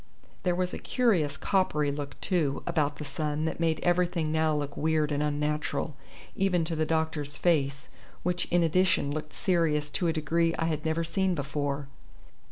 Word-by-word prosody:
There 180 -2 +1
was 180 0 -1
a - - -4
curious 175 - +1
coppery 150 -7 +1
look, 140 -1 -6
too, 155 -7 0
about 145 -2 +1
the 150 - -7
sun 150 0 -2
that 160 - -2
made 165 -2 +1
everything 175 -3 +1
now 155 -1 +2
look 145 -1 -3
weird 155 -1 +1
and 145 0 0
unnatural, 150 0 -1 0.4
even 180 -4 +2
to 165 0 -3
the 155 0 0
doctor's 160 -3 -1
face, 140 -5 +1 0.4
which 180 0 0
in 175 0 +2
addition 165 -3 +2
looked 155 0 -4
serious 165 -7 +1
to 175 - 0
a 165 - +2
degree 165 +1 +1
I 165 - 0
had 155 -1 -2
never 160 +1 +1
seen 185 +2 0
before. 140 -1 -2
160 Hz, 175 wpm, -29 LUFS, 150-170 Hz, 0.4 s, now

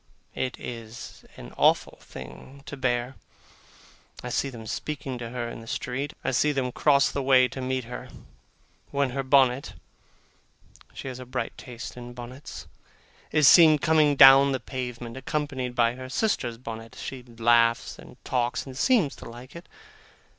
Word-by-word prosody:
It 130 -1 -3
is 115 -1 -9
an - - -11
awful - - +2
thing 65 - -11
to 140 - -7
bear. 125 -1 -1 1.1
I 125 - -5
see 135 +3 -1
them 115 -4 -10
speaking 135 +1 -5
to 115 -1 -6
her 120 -1 -4
in 115 - -8
the 115 - -13
street. 135 +5 -3
I - - 0
see 150 +4 +2
them 135 -3 -1
cross 140 +1 +3
the 140 - -2
way 130 -1 +5
to 130 - -7
meet 130 0 -2
her, 125 +1 -8 0.8
when 140 -2 0
her 135 +2 -2
bonnet 130 -1 +3 1.2
(she - - -7
has 130 -1 -6
a 130 - -8
bright 125 - -4
taste 120 -1 -9
in 120 0 -9
bonnets) 125 +3 -9 0.7
is 150 -3 +4
seen 160 -3 +8
coming 155 -1 +3
down 135 +1 +8
the 130 - -1
pavement, 125 -1 -6
accompanied 135 -2 -3
by 120 -1 +3
her 130 +1 -9
sister's 130 - -1
bonnet. 115 -1 -8
She 130 -2 -6
laughs 115 -1 +2
and - - -14
talks, 125 -1 -1
and 135 -2 -9
seems 190 - +2
to - - -10
like 125 +5 -12
it. 170 - -11
130 Hz, 160 wpm, -26 LUFS, 120-140 Hz, 1.2 s, seen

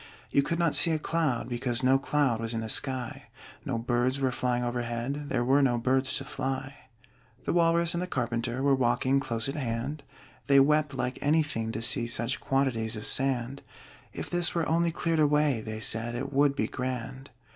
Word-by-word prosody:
You 140 - +4
could 165 +4 -2
not 170 -3 +1
see 170 - +7
a - - +1
cloud, 150 -7 -1
because 120 0 -2
No 130 +1 +4
cloud 135 -5 0
was 115 0 -3
in 115 - -2
the 110 - -5
sky. 130 +2 -1 0.4
No 135 -6 -2
birds 120 +3 0
were 130 -2 +1
flying 125 0 -1
overhead 120 +4 -3
There 120 - 0
were 135 +3 +4
no 125 -3 +2
birds 130 +2 +1
to 135 - -6
fly. 135 0 -4 0.7
The - - -1
Walrus 170 0 +3
and 170 - -2
the 180 - -3
Carpenter 120 -2 -2
Were 140 -1 +4
walking 130 +1 +2
close 115 -4 -2
at 135 - -3
hand; 130 +2 -3 0.5
They 140 0 +6
wept 150 0 +3
like 130 -1 -3
anything 145 -7 +1
to 110 - -3
see 120 0 +1
Such 115 +2 -1
quantities 125 -5 0
of 105 - -7
sand: 135 0 0 0.5
"If - - -6
this 175 0 +1
were 165 -2 0
only 170 +1 +2
cleared 165 -1 -1
away," 150 -4 +2
They 110 0 -6
said, 115 +1 0
"it 135 +3 -4
would 140 0 +3
be - - 0
grand!" 130 +1 -5
130 Hz, 190 wpm, -28 LUFS, 120-145 Hz, 0.7 s, see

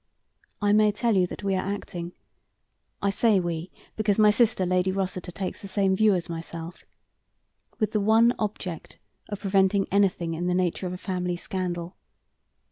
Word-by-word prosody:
I 205 0 +4
may 210 0 +5
tell 225 +1 0
you 185 -1 +3
that - - -8
we 195 -1 0
are 185 - 0
acting 180 -3 -5 0.9
I 200 - +2
say 215 -1 +3
'we,' 170 0 -3 0.3
because 215 -2 +1
my 210 -1 +6
sister, 210 -4 +2
Lady 180 +1 +1
Rossiter, 185 -2 -3
takes 185 +1 -5
the 200 - -7
same 190 0 +1
view 210 0 +4
as 175 -2 -3
myself 165 +1 -7 0.9
with 215 -2 0
the 210 - +1
one 225 +3 +5
object 195 -6 -5 0.3
of 205 -2 -5
preventing 195 0 +2
anything 190 -4 +2
in 175 +2 -2
the 180 - +1
nature 180 0 0
of 180 - -4
a - - -5
family 180 -2 -2
scandal. 180 -2 -4
190 Hz, 170 wpm, -26 LUFS, 180-205 Hz, 0.9 s, my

